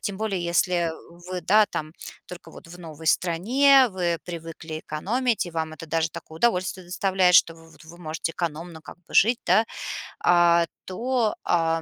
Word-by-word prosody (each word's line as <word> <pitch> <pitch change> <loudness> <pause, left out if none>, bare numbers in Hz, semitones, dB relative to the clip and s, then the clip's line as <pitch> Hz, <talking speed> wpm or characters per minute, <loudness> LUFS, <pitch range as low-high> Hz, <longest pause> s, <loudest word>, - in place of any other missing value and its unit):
тем 200 -2 -4
более, 195 -5 -2
если 175 -1 +1 0.4
вы, 185 -1 -4
да, 210 +4 +4
там, 155 -2 -5 0.3
только 180 -1 -11
вот - - -14
в 175 +1 -12
новой 160 -1 -10
стране, 255 - +4
вы 175 -3 -1
привыкли 165 -2 -7
экономить 225 +7 -1
и - - -7
вам 160 -1 -3
это 160 +2 -10
даже 165 0 0
такое 160 - -10
удовольствие 185 -4 0
доставляет, 185 -1 +2
что 165 - +4
в 165 0 -18
вот 155 - -18
вы 170 +2 -14
можете 160 0 -4
экономно 165 0 -5
как - - -11
бы - - -14
жить, 230 +4 +5
да. 220 - +4 0.6
А, 170 -1 +4 0.2
то, 235 +3 -1
а, 165 -1 +1
175 Hz, 175 wpm, -24 LUFS, 165-195 Hz, 0.6 s, жить